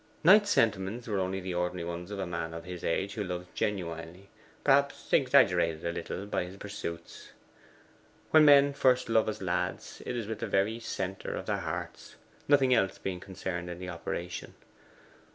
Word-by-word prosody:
Knight's 205 Hz, +5 st, +7 dB
sentiments 110 Hz, -, +1 dB
were 105 Hz, -3 st, 0 dB
only 95 Hz, +1 st, -1 dB
the 90 Hz, -1 st, -4 dB
ordinary 90 Hz, -1 st, -2 dB
ones 85 Hz, +1 st, -5 dB
of 105 Hz, -, -5 dB
a 95 Hz, -, -2 dB
man 80 Hz, -1 st, -4 dB
of 85 Hz, -, -7 dB
his 90 Hz, -1 st, -8 dB
age 95 Hz, +4 st, -1 dB
who 105 Hz, -, -3 dB
loves 90 Hz, -1 st, -4 dB
genuinely, 90 Hz, -1 st, -4 dB, 0.3 s
perhaps 140 Hz, 0 st, +2 dB
exaggerated 80 Hz, -1 st, +4 dB
a 85 Hz, -, 0 dB
little 85 Hz, +3 st, -5 dB
by 100 Hz, -, -1 dB
his 90 Hz, +2 st, -9 dB
pursuits. 85 Hz, -5 st, -7 dB, 1.0 s
When 155 Hz, -1 st, +7 dB
men 140 Hz, -1 st, +7 dB
first 130 Hz, -3 st, +2 dB
love 110 Hz, -1 st, +3 dB
as 105 Hz, -, -5 dB
lads, 90 Hz, -1 st, -2 dB
it 125 Hz, -, -3 dB
is 115 Hz, -, -3 dB
with 110 Hz, +1 st, -5 dB
the 115 Hz, -, -3 dB
very 100 Hz, +3 st, +1 dB
centre 95 Hz, -4 st, -4 dB
of -, -, -5 dB
their -, -, 0 dB
hearts, -, -, -6 dB, 0.3 s
nothing 135 Hz, -3 st, +5 dB
else 95 Hz, -5 st, +2 dB
being 90 Hz, -2 st, -4 dB
concerned 90 Hz, -2 st, -5 dB
in 85 Hz, -, -6 dB
the 90 Hz, 0 st, -6 dB
operation. 85 Hz, 0 st, -5 dB
95 Hz, 175 wpm, -30 LUFS, 90-115 Hz, 1.0 s, Knight's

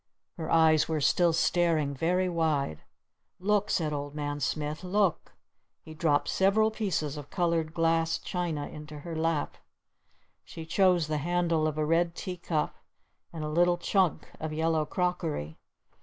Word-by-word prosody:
Her 160 Hz, -2 st, -5 dB
eyes 160 Hz, -2 st, +4 dB
were 160 Hz, -1 st, 0 dB
still 170 Hz, +4 st, +3 dB
staring 165 Hz, -3 st, +1 dB
very 180 Hz, +6 st, +1 dB
wide. 155 Hz, -, 0 dB, 0.6 s
"Look!" 205 Hz, +2 st, +1 dB
said 155 Hz, -3 st, 0 dB
Old 145 Hz, 0 st, -5 dB
Man 145 Hz, -1 st, -3 dB
Smith. 150 Hz, +3 st, -2 dB
"Look!" 190 Hz, -1 st, 0 dB, 0.5 s
He 160 Hz, -, -10 dB
dropped 155 Hz, -2 st, +1 dB
several 215 Hz, +3 st, +3 dB
pieces 165 Hz, -9 st, -2 dB
of 145 Hz, -1 st, -8 dB
colored 165 Hz, -3 st, 0 dB
glass 165 Hz, 0 st, +1 dB
china 170 Hz, -5 st, -3 dB
into 150 Hz, -1 st, -9 dB
her 165 Hz, +2 st, -6 dB
lap. 160 Hz, -2 st, -1 dB, 0.9 s
She 160 Hz, -, -9 dB
chose 180 Hz, 0 st, +3 dB
the 155 Hz, 0 st, -2 dB
handle 170 Hz, 0 st, +1 dB
of 155 Hz, -1 st, -3 dB
a 155 Hz, -, +1 dB
red 165 Hz, +2 st, +1 dB
tea 180 Hz, -1 st, -5 dB
cup 160 Hz, -3 st, -2 dB, 0.5 s
and 160 Hz, -2 st, -6 dB
a -, -, -2 dB
little 175 Hz, +3 st, +3 dB
chunk 185 Hz, -1 st, +1 dB
of 155 Hz, 0 st, -4 dB
yellow 160 Hz, 0 st, 0 dB
crockery. 165 Hz, -, -2 dB
165 Hz, 150 wpm, -29 LUFS, 150-175 Hz, 0.9 s, eyes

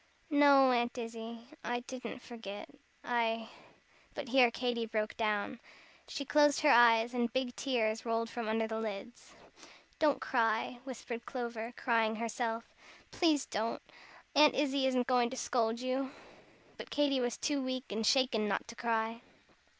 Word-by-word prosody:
"No, 280 Hz, -2 st, +6 dB
Aunt 240 Hz, +1 st, 0 dB
Izzie 230 Hz, 0 st, -6 dB, 0.2 s
I 240 Hz, 0 st, -2 dB
didn't 255 Hz, 0 st, -8 dB
forget. 225 Hz, -4 st, -8 dB, 0.4 s
I 230 Hz, -2 st, 0 dB, 0.3 s
" -, -, -31 dB
but 285 Hz, -4 st, -5 dB
here 250 Hz, -1 st, +6 dB
Katy 235 Hz, -1 st, -2 dB
broke 215 Hz, -1 st, -2 dB
down. 215 Hz, +2 st, -1 dB, 0.5 s
She 280 Hz, -, -5 dB
closed 295 Hz, +1 st, +4 dB
her 300 Hz, -2 st, +5 dB
eyes, 235 Hz, 0 st, +6 dB
and 240 Hz, -1 st, 0 dB
big 260 Hz, -1 st, -2 dB
tears 225 Hz, -5 st, 0 dB
rolled 230 Hz, 0 st, -1 dB
from 230 Hz, -1 st, -4 dB
under 225 Hz, 0 st, +1 dB
the 220 Hz, 0 st, -3 dB
lids. 220 Hz, +2 st, -7 dB, 0.7 s
"Don't 300 Hz, -3 st, +3 dB
cry," 230 Hz, 0 st, 0 dB
whispered 240 Hz, -2 st, -7 dB
Clover, 235 Hz, -3 st, -4 dB
crying 225 Hz, -2 st, +1 dB
herself, 230 Hz, 0 st, -3 dB, 0.4 s
"please 310 Hz, -5 st, +2 dB
don't. 220 Hz, +2 st, -2 dB, 0.6 s
Aunt 300 Hz, +1 st, +6 dB
Izzie 275 Hz, -1 st, +1 dB
isn't 255 Hz, -1 st, +1 dB
going 245 Hz, -2 st, +2 dB
to 260 Hz, -, -7 dB
scold 230 Hz, -2 st, 0 dB
you." 260 Hz, +1 st, -1 dB, 0.7 s
But -, -, -8 dB
Katy 285 Hz, -2 st, +2 dB
was 245 Hz, -2 st, -1 dB
too 290 Hz, -2 st, -1 dB
weak 255 Hz, -1 st, -4 dB
and 220 Hz, +2 st, -2 dB
shaken 240 Hz, -3 st, +3 dB
not 195 Hz, -, -1 dB
to 235 Hz, -, -9 dB
cry. 230 Hz, -1 st, -1 dB
240 Hz, 150 wpm, -33 LUFS, 225-260 Hz, 0.7 s, No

